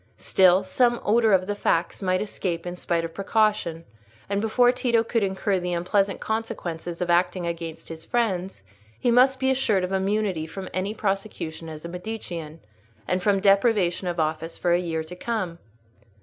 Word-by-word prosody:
Still, 185 0 +4
some 240 +5 +2
odour 225 +1 +4
of 185 -1 +4
the 205 - -1
facts 170 -3 0
might 185 0 +1
escape 180 -5 -4
in 175 0 -4
spite 170 -1 -1
of 165 - -7
precaution, 195 -4 0 0.4
and 200 0 -1
before 245 +3 +4
Tito 240 -2 +1
could 230 0 0
incur 195 0 0
the 180 0 -2
unpleasant 195 +3 +1
consequences 180 -7 -4
of 175 - 0
acting 180 +1 +2
against 165 -1 -5
his 160 0 -8
friends, 195 - -1 0.4
he 240 - +2
must 260 +2 +5
be 265 0 +2
assured 220 -8 +1
of 180 - -2
immunity 195 -3 0
from 190 +3 -7
any 195 +3 -2
prosecution 195 -6 -3
as 155 +1 -9
a - - -3
Medicean, 175 -4 -6 0.5
and 180 +1 0
from 200 0 +2
deprivation 195 -2 +3
of 175 -1 -2
office 160 +1 -2
for 175 - +1
a 175 - +3
year 165 -2 -2
to 165 +3 -9
come. 185 -5 -3
185 Hz, 175 wpm, -25 LUFS, 170-215 Hz, 0.5 s, must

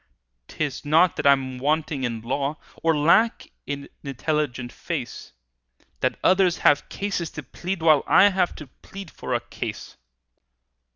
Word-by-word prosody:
"'Tis 145 -4 -4
not 160 +4 +4
that - - 0
I'm 130 -2 +2
wanting 150 0 0
in 115 -3 -2
law, 140 +5 -2 0.2
Or 165 -1 +2
lack 170 +10 +3 0.2
an 140 0 -5 0.2
intelligent 140 -3 -2
face, - - -6 0.7
That - - 0
others 185 -2 +4
have 145 -1 +4
cases 195 -5 -3
to 150 - -5
plead, 175 +6 -5
While 155 -3 +5
I 200 - +6
have 185 -2 0
to 150 - -9
plead 190 +6 -12
for - - -4
a - - +1
case. - - -7
150 Hz, 140 wpm, -24 LUFS, 140-175 Hz, 0.7 s, I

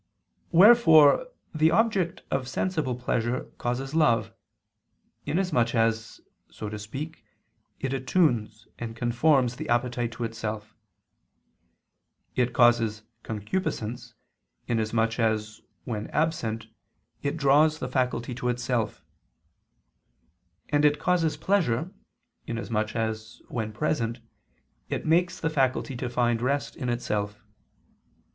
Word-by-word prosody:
Wherefore 180 - +7 0.3
the 155 0 +4
object 200 -5 +1
of 130 -2 -1
sensible 150 -2 -1
pleasure 125 0 -1 0.2
causes 130 +3 -2
love, 150 -8 +2 0.9
inasmuch 150 -10 +1
as, 115 0 0 0.3
so 105 - -7
to 105 0 -6
speak, 140 +10 -7 0.6
it 135 0 -2
attunes 120 - 0
and 115 -1 -5
conforms 125 +1 +2
the - - -6
appetite 120 0 0
to 120 - -5
itself; 110 -1 -5 1.6
it 125 -1 +1
causes 115 -3 +3 0.2
concupiscence, 115 - -4 0.5
inasmuch 115 0 0
as, 110 -2 -1 0.2
when 110 -3 -4
absent, 115 -9 -1 0.6
it 140 +2 -2
draws 150 +2 +4
the 130 - -4
faculty 125 -1 -1
to 125 0 -2
itself; 120 -2 -2 1.7
and 145 0 +2
it 150 0 +4
causes 165 -3 +1
pleasure, 165 -3 0 0.5
inasmuch 115 -2 -2
as, 110 0 -3
when 110 -3 -3
present, 120 -1 -1 0.7
it - - -3
makes 175 +3 +2
the 160 - -1
faculty 135 -2 0
to 125 0 -3
find 120 -1 +1
rest 140 +3 -1
in 125 - -3
itself. 105 -4 -2
120 Hz, 110 wpm, -27 LUFS, 115-150 Hz, 1.7 s, Wherefore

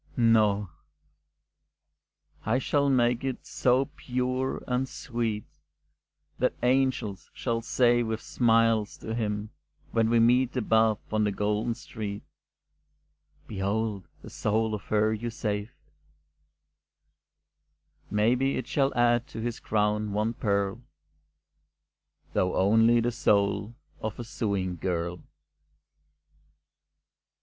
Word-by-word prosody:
No, 105 -5 +3 1.7
I 115 +4 +1
will 140 -1 +4
make 120 -1 +2
it 135 -2 -4
so 130 +2 +2
pure 130 +1 -2
and 130 +1 0
sweet, 115 -5 -3 1.0
That - - +1
angels 125 -6 +1
shall 115 -2 -1
say 120 +1 +3
with 110 -1 -2
smiles 115 -3 +2
to 110 - -6
him, 105 -2 -2 0.4
When 115 -1 +2
we 115 0 +4
meet 125 +3 +3
above 110 -2 +3 0.2
on 110 0 +2
the 105 - +1
golden 105 +3 -1
street: 105 -3 -6 1.2
"Behold 100 0 -2 0.2
the - - -10
soul 110 +1 0
of 105 -2 -5
her 110 0 +2
you 115 +2 -3
saved." 105 -2 -3 2.3
Maybe 120 +6 +2
it 130 - -3
shall 140 +1 +1
add 120 +1 +3
to 125 - -8
his 115 0 -3
crown 105 -1 0
one 105 +3 0
pearl, 100 0 -1 1.5
Though 90 0 +1
only 115 +4 +4
the 120 +1 0
soul 100 -1 +1 0.3
of 110 -1 -4
a 120 - -5
sewing 100 -6 -2
girl. 85 0 -2
110 Hz, 105 wpm, -27 LUFS, 105-120 Hz, 2.3 s, will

